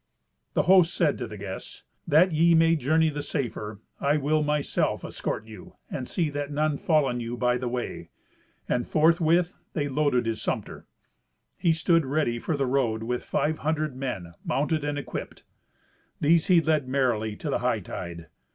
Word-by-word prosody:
The - - +3
host 180 -1 +5
said - - +1
to - - -3
the - - -9
guests, - - -8 0.2
"That 170 +5 +5
ye 165 +2 +4
may 165 0 +5
journey 160 +2 +2
the 145 0 -4
safer, 110 -8 -4 0.2
I 145 +2 +2
will 150 +2 +1
myself 150 -1 0
escort 110 - -4
you, 110 -4 -12 0.2
and 125 - -4
see 165 -5 -1
that 145 0 -3
none 150 0 0
fall 155 -3 +3
on 125 -2 -2
you 120 +1 -4
by 125 0 +1
the 125 - -3
way." 120 0 -4 0.6
And 120 -1 0
forthwith 165 +2 +3
they 145 -4 -1
loaded 140 -3 +1
his 115 -1 -2
sumpter. - - -4 0.7
He 170 - +2
stood 165 +1 +3
ready 135 -4 0
for 150 +5 -2
the 140 - +1
road 125 -4 0
with 125 +1 -2
five 155 +1 -1
hundred 155 -2 -1
men, 120 -11 -5
mounted 150 +2 0
and 145 0 -2
equipped. 145 - -6 0.8
These 165 +3 +3
he 180 -4 +6
led 155 -4 +1
merrily 120 -5 0
to - - -4
the - - 0
hightide. 85 -2 -3
145 Hz, 170 wpm, -26 LUFS, 125-160 Hz, 0.8 s, he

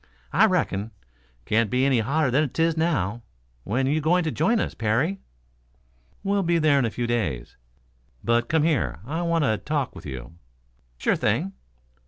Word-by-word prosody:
"I 220 - +6
reckon. 115 - 0 0.6
Can't 110 0 +2
be 125 +4 +2
any 135 -3 +3
hotter 135 +4 +1
than 145 +3 +2
'tis 165 +4 +1
now. 120 - 0 0.4
When 125 +6 0
you 150 +4 +1
going 175 +4 +3
to 160 - -1
join 220 +12 +2
us, - - -2
Parry?" 120 - 0 1.0
"We'll 200 0 +1
be 170 -2 +2
there 155 -3 +4
in 130 - +2
a - - 0
few 120 +2 -3
days. 100 - -2 0.7
But 120 0 +1
come 160 -2 +2
here; 155 - 0
I 160 +6 -3
want 170 -2 +1
to 110 -6 +1
talk 145 +2 -2
with - - -9
you?" 65 +1 -7 0.6
"Sure - - +1
thing." 155 - 0
140 Hz, 170 wpm, -25 LUFS, 115-165 Hz, 1.0 s, I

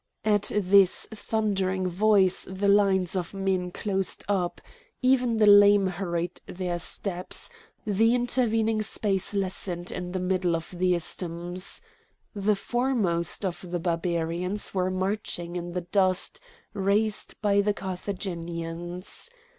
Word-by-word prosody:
At 210 -1 +2
this 195 -2 +4
thundering 195 -4 -1
voice 190 0 +3
the 190 +2 -1
lines 195 -3 +3
of 180 +1 -3
men 190 -2 0
closed 195 0 -2
up; 185 -4 -1 0.4
even 250 -3 +3
the 215 - +5
lame 205 -1 +7
hurried 175 -2 -3
their 180 -1 -3
steps; 180 - -3 0.3
the 220 +3 +3
intervening 225 -3 +1
space 205 -2 0
lessened 185 -2 -2
in 180 0 -5
the 185 - -2
middle 180 -2 +1
of 165 -1 -5
the 180 0 +2
isthmus. 175 +1 -3 0.5
The 205 0 +1
foremost 205 -7 -1
of 185 -1 -3
the 175 0 -2
Barbarians 170 +3 -1
were 185 -1 +1
marching 185 -2 -3
in 175 0 -4
the 180 - -2
dust 185 +1 +1 0.3
raised 210 +2 0
by 200 -1 +3
the 205 0 0
Carthaginians. 175 - -5
190 Hz, 125 wpm, -27 LUFS, 175-205 Hz, 0.5 s, lame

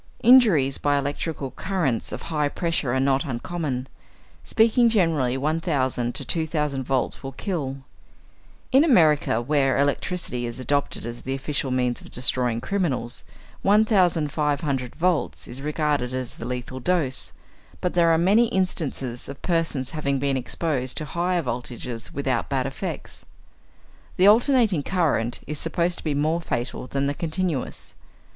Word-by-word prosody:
Injuries 210 - +6
by 145 -1 +2
electrical 140 0 -3
currents 165 - -1
of - - -6
high 150 -2 +1
pressure 165 -6 -1
are 130 - +1
not 135 0 +2
uncommon; 135 0 -3 0.6
speaking 230 +2 +4
generally, 160 - +2
1,000 135 -5 0
to 140 - -4
2,000 150 -2 -1
volts 130 0 -1
will 135 0 -6
kill. 140 -5 -3 0.9
In 270 +3 +6
America, 155 - +4
where 135 -1 +2
electricity 140 -2 -1
is 120 +2 -6
adopted 140 0 -1
as 120 0 -6
the 135 +1 -3
official 140 0 -2
means 125 -1 0
of - - -13
destroying 125 -2 0
criminals, 140 -9 -2 0.4
1,500 155 - +2
volts 175 -2 0
is 130 +2 -6
regarded 145 -4 -1
as 130 -2 -3
the 115 - -8
lethal 125 +1 -5
dose, 145 -2 0 0.5
but 180 - -1
there 170 -1 +4
are 165 - +4
many 200 +8 +4
instances 150 - -2
of 140 - -8
persons 160 -7 0
having 140 -3 -1
been 140 0 0
exposed 130 0 -2
to 155 - -2
higher 175 +3 0
voltages 120 -1 -5
without 130 -3 -1
bad 130 -2 0
effects. 135 0 -5 0.9
The 185 - +5
alternating 225 - +5
current 140 -9 0
is 150 0 -4
supposed 170 +1 0
to - - -11
be 150 -3 -1
more 155 +4 +1
fatal 120 -3 -3
than 135 +1 -1
the 140 - 0
continuous. 165 -3 -3
145 Hz, 140 wpm, -24 LUFS, 130-170 Hz, 0.9 s, Injuries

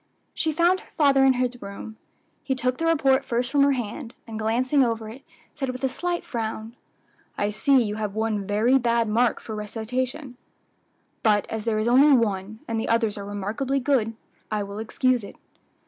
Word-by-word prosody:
She 320 - 0
found 345 +4 +3
her - - -18
father 280 -3 +3
in 265 - +6
his 245 -1 -2
room. 200 +2 -8 0.5
He 270 -2 -1
took 255 0 -1
the 330 - 0
report 275 -4 +3
first 245 0 -1
from 285 - +3
her 280 0 +5
hand, 235 -1 -5
and 220 -1 -6
glancing 255 +6 +2
over 225 -2 -1
it, 245 +5 -10 0.3
said 270 -2 -3
with 255 +1 -6
a 265 - +2
slight 350 +5 -2
frown, 225 -1 -4 0.6
"I 205 0 0
see 260 +4 +3
you 210 -1 -3
have 210 -2 -3
one 215 -3 -1
very 225 +6 +3
bad 235 -2 +1
mark 230 +2 +2
for 220 - -8
recitation; 245 +5 -4 0.8
but 210 -2 +3
as 220 -1 -4
there 225 -2 +1
is 215 +1 0
only 270 +3 +6
one, 210 -1 -2
and 225 -1 -1
the - - -3
others 225 -2 +2
are 200 -1 -6
remarkably 215 +7 -2
good, 250 -5 +1 0.3
I 210 -1 -1
will 200 +1 -7
excuse 245 +2 +1
it." 200 - -10
235 Hz, 190 wpm, -25 LUFS, 215-265 Hz, 0.8 s, in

